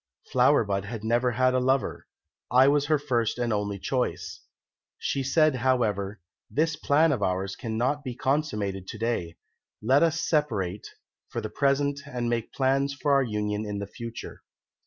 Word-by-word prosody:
Flower -, -, +4 dB
bud 100 Hz, -1 st, -2 dB
had 110 Hz, +1 st, -6 dB
never 120 Hz, +2 st, +1 dB
had 130 Hz, +2 st, +3 dB
a 130 Hz, -, +3 dB
lover; 130 Hz, +1 st, 0 dB, 0.4 s
I 130 Hz, +2 st, +6 dB
was 145 Hz, 0 st, +3 dB
her 155 Hz, 0 st, +3 dB
first 120 Hz, -7 st, 0 dB
and 120 Hz, -2 st, 0 dB
only 105 Hz, -1 st, -1 dB
choice. 85 Hz, -8 st, -2 dB, 0.6 s
She 135 Hz, -, -1 dB
said, 155 Hz, +1 st, +3 dB
however, 110 Hz, -6 st, 0 dB, 0.3 s
'This 160 Hz, +1 st, +1 dB
plan 155 Hz, +2 st, +3 dB
of 130 Hz, -, -1 dB
ours 95 Hz, +1 st, -1 dB
cannot 125 Hz, +6 st, -1 dB
be 125 Hz, -3 st, -5 dB
consummated 105 Hz, -10 st, -1 dB
to -, -, -7 dB
day; 110 Hz, -8 st, -2 dB, 0.4 s
let 130 Hz, +6 st, +3 dB
us 165 Hz, -1 st, +2 dB
separate 110 Hz, -, -1 dB, 0.4 s
for 120 Hz, -, -3 dB
the 110 Hz, -1 st, -5 dB
present 140 Hz, +2 st, +1 dB
and 120 Hz, -1 st, -2 dB
make 115 Hz, -1 st, -2 dB
plans 135 Hz, +1 st, +1 dB
for 145 Hz, 0 st, +1 dB
our 140 Hz, -, +5 dB
union 105 Hz, -3 st, -2 dB
in 105 Hz, -1 st, -4 dB
the 100 Hz, -, -3 dB
future.' 115 Hz, +3 st, -8 dB
120 Hz, 165 wpm, -27 LUFS, 105-140 Hz, 0.6 s, I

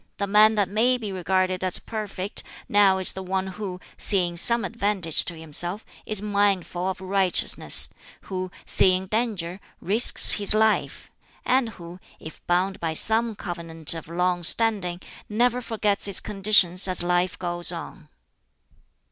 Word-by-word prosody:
The 200 Hz, -, -2 dB
man 210 Hz, +2 st, +4 dB
that 205 Hz, -2 st, 0 dB
may 230 Hz, +6 st, 0 dB
be 215 Hz, -5 st, -7 dB
regarded 185 Hz, 0 st, -2 dB
as 185 Hz, -1 st, +3 dB
perfect 205 Hz, -3 st, -5 dB, 0.3 s
now 200 Hz, -2 st, +3 dB
is 190 Hz, -, +1 dB
the 190 Hz, -, -9 dB
one 190 Hz, 0 st, -3 dB
who, 190 Hz, -1 st, -8 dB, 0.2 s
seeing 180 Hz, -4 st, 0 dB
some 235 Hz, +5 st, +3 dB
advantage 200 Hz, -6 st, 0 dB
to 170 Hz, -, -6 dB
himself, 175 Hz, +5 st, -3 dB, 0.2 s
is 210 Hz, -2 st, 0 dB
mindful 200 Hz, -3 st, -1 dB
of 190 Hz, -, -7 dB
righteousness; 190 Hz, -1 st, +1 dB, 0.3 s
who, 185 Hz, -1 st, -6 dB, 0.2 s
seeing 185 Hz, 0 st, +2 dB
danger, 200 Hz, -4 st, -4 dB, 0.2 s
risks 215 Hz, +6 st, +5 dB
his 205 Hz, 0 st, +4 dB
life; 220 Hz, 0 st, -1 dB, 0.3 s
and 255 Hz, -2 st, 0 dB
who, 175 Hz, +1 st, -12 dB, 0.2 s
if 160 Hz, -, -13 dB
bound 185 Hz, +2 st, -1 dB
by 165 Hz, -1 st, -4 dB
some 225 Hz, +6 st, +2 dB
covenant 165 Hz, -5 st, 0 dB
of 165 Hz, -2 st, -9 dB
long 180 Hz, +1 st, -2 dB
standing, 185 Hz, -2 st, +1 dB, 0.3 s
never 245 Hz, +3 st, 0 dB
forgets 210 Hz, -4 st, -3 dB
its 200 Hz, -, +3 dB
conditions 195 Hz, -3 st, +3 dB
as 185 Hz, -2 st, +6 dB
life 180 Hz, +1 st, -1 dB
goes 175 Hz, -1 st, 0 dB
on." 165 Hz, -2 st, -10 dB
190 Hz, 145 wpm, -23 LUFS, 175-210 Hz, 0.3 s, as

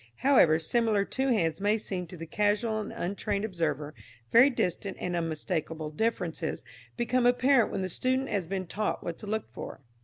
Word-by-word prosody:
However 175 Hz, -, +6 dB
similar 210 Hz, +4 st, +1 dB
two 265 Hz, +5 st, -1 dB
hands 195 Hz, -9 st, +1 dB
may 205 Hz, +2 st, +3 dB
seem 185 Hz, -4 st, -4 dB
to 180 Hz, -, -10 dB
the 165 Hz, -, -6 dB
casual 210 Hz, +5 st, +1 dB
and 215 Hz, -, -5 dB
untrained 200 Hz, +3 st, -2 dB
observer, 155 Hz, -6 st, -2 dB, 0.4 s
very 250 Hz, +4 st, +8 dB
distinct 195 Hz, -5 st, -2 dB
and 180 Hz, -1 st, -2 dB
unmistakable 160 Hz, -1 st, -2 dB
differences 175 Hz, -3 st, -2 dB, 0.3 s
become 240 Hz, +1 st, +2 dB
apparent 245 Hz, 0 st, +4 dB
when 195 Hz, -, -2 dB
the -, -, -1 dB
student 260 Hz, +7 st, 0 dB
has 190 Hz, -5 st, -1 dB
been 190 Hz, +1 st, -3 dB
taught 210 Hz, +5 st, -2 dB
what 170 Hz, -, -5 dB
to 210 Hz, -, -9 dB
look 220 Hz, +1 st, -3 dB
for. -, -, -7 dB
200 Hz, 175 wpm, -29 LUFS, 165-230 Hz, 0.4 s, very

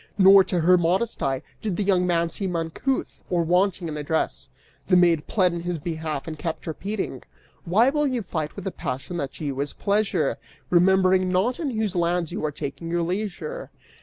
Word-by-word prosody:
Nor, 195 Hz, 0 st, +8 dB
to 175 Hz, -, 0 dB
her 180 Hz, +2 st, +5 dB
modest 185 Hz, +7 st, 0 dB
eye, 135 Hz, -1 st, -1 dB, 0.2 s
did 205 Hz, -5 st, -2 dB
the 210 Hz, -, +1 dB
young 185 Hz, -2 st, +2 dB
man 170 Hz, -1 st, +1 dB
seem 185 Hz, -1 st, -2 dB
uncouth 165 Hz, +11 st, -2 dB
or 175 Hz, -1 st, +1 dB
wanting 180 Hz, +1 st, +1 dB
in 155 Hz, -1 st, -4 dB
address. 145 Hz, -, -1 dB, 0.4 s
The 180 Hz, -, +5 dB
maid 170 Hz, -4 st, +3 dB
pled 185 Hz, -5 st, +2 dB
in 170 Hz, -, -3 dB
his 175 Hz, 0 st, -2 dB
behalf 160 Hz, -2 st, -4 dB
and 155 Hz, -2 st, -6 dB
kept 165 Hz, 0 st, -4 dB
repeating: 195 Hz, +6 st, -4 dB, 0.4 s
Why 220 Hz, +10 st, +4 dB
will 295 Hz, 0 st, +1 dB
you 250 Hz, -4 st, -1 dB
fight 160 Hz, -4 st, -4 dB
with 200 Hz, -, -8 dB
a 190 Hz, -, -1 dB
passion 135 Hz, +6 st, -5 dB
that 140 Hz, -5 st, -3 dB
to 155 Hz, -, -7 dB
you 135 Hz, -2 st, -3 dB
is 145 Hz, 0 st, -3 dB
pleasure, 200 Hz, -4 st, 0 dB, 0.3 s
Remembering 185 Hz, +1 st, +4 dB
not 200 Hz, +8 st, +1 dB
in 310 Hz, -4 st, -1 dB
whose 220 Hz, -5 st, -2 dB
lands 175 Hz, -1 st, 0 dB
you 185 Hz, -, -4 dB
are 155 Hz, -, 0 dB
taking 145 Hz, +3 st, -6 dB
your 170 Hz, 0 st, 0 dB
leisure? 210 Hz, -, -4 dB
180 Hz, 195 wpm, -24 LUFS, 165-195 Hz, 0.4 s, Nor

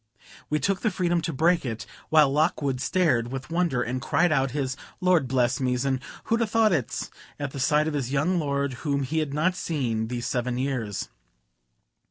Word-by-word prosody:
We 150 Hz, -, +2 dB
took 195 Hz, +1 st, 0 dB
the 220 Hz, -, +2 dB
freedom 175 Hz, -3 st, 0 dB
to 165 Hz, -, -2 dB
break 165 Hz, +4 st, +2 dB
it, 115 Hz, -4 st, -4 dB, 0.2 s
while 155 Hz, -3 st, +5 dB
Lockwood 145 Hz, -3 st, +1 dB
stared 130 Hz, -10 st, +1 dB
with 135 Hz, +3 st, -6 dB
wonder, 165 Hz, -8 st, +1 dB
and 125 Hz, +2 st, -3 dB
cried 175 Hz, +6 st, +2 dB
out 135 Hz, -3 st, +2 dB
his 130 Hz, -1 st, -2 dB, 0.2 s
"Lord 180 Hz, -7 st, +3 dB
bless 125 Hz, -1 st, +1 dB
me's," 125 Hz, -1 st, 0 dB
and 135 Hz, -1 st, +1 dB, 0.2 s
"Who'd 230 Hz, +1 st, +1 dB
a 230 Hz, -, +2 dB
thought 220 Hz, -2 st, +3 dB
it's," 140 Hz, -8 st, -2 dB, 0.3 s
at 145 Hz, -2 st, -3 dB
the 140 Hz, -, -6 dB
sight 150 Hz, +3 st, +3 dB
of 160 Hz, -, -2 dB
his 135 Hz, -3 st, -2 dB
young 160 Hz, +6 st, +1 dB
lord, 140 Hz, -3 st, -1 dB
whom 140 Hz, -2 st, 0 dB
he 160 Hz, +5 st, -1 dB
had 155 Hz, -3 st, -1 dB
not 165 Hz, +6 st, +1 dB
seen 120 Hz, -11 st, -1 dB
these 120 Hz, 0 st, -4 dB
seven 125 Hz, 0 st, -1 dB
years. 125 Hz, -6 st, -2 dB
140 Hz, 195 wpm, -26 LUFS, 130-165 Hz, 0.3 s, while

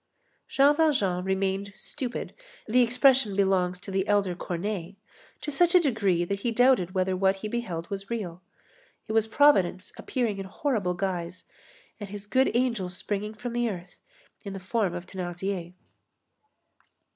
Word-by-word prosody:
Jean 280 Hz, +2 st, +4 dB
Valjean 235 Hz, -, +2 dB
"remained 195 Hz, +1 st, -1 dB
stupid"—the 250 Hz, -, -3 dB
expression 250 Hz, -3 st, +4 dB
belongs 190 Hz, -2 st, +2 dB
to 195 Hz, -, -8 dB
the 190 Hz, +1 st, 0 dB
elder 200 Hz, -3 st, +2 dB
Corneille—to 195 Hz, -, -6 dB
such 345 Hz, +5 st, +3 dB
a -, -, +9 dB
degree 205 Hz, -, +1 dB
that 200 Hz, +2 st, -2 dB
he 235 Hz, -, -1 dB
doubted 230 Hz, -6 st, +3 dB
whether 185 Hz, 0 st, +1 dB
what 190 Hz, +1 st, +2 dB
he 195 Hz, +2 st, -6 dB
beheld 210 Hz, -8 st, -4 dB
was 195 Hz, 0 st, -5 dB
real. 185 Hz, -7 st, -4 dB, 0.7 s
It -, -, -4 dB
was 220 Hz, 0 st, +3 dB
Providence 220 Hz, -8 st, +3 dB
appearing 230 Hz, -6 st, -2 dB
in 195 Hz, -, -4 dB
horrible 200 Hz, -4 st, -1 dB
guise, 180 Hz, -1 st, -3 dB, 0.6 s
and 205 Hz, -2 st, -7 dB
his 205 Hz, 0 st, -7 dB
good 260 Hz, +5 st, +3 dB
angel 235 Hz, -7 st, +1 dB
springing 205 Hz, +4 st, -3 dB
from 240 Hz, +2 st, -5 dB
the 240 Hz, -1 st, +1 dB
earth 180 Hz, -3 st, -8 dB, 0.5 s
in 200 Hz, -3 st, -6 dB
the 195 Hz, -, -6 dB
form 190 Hz, -1 st, -1 dB
of 175 Hz, 0 st, -6 dB
Thénardier. 180 Hz, -1 st, -4 dB
200 Hz, 145 wpm, -27 LUFS, 185-235 Hz, 0.7 s, a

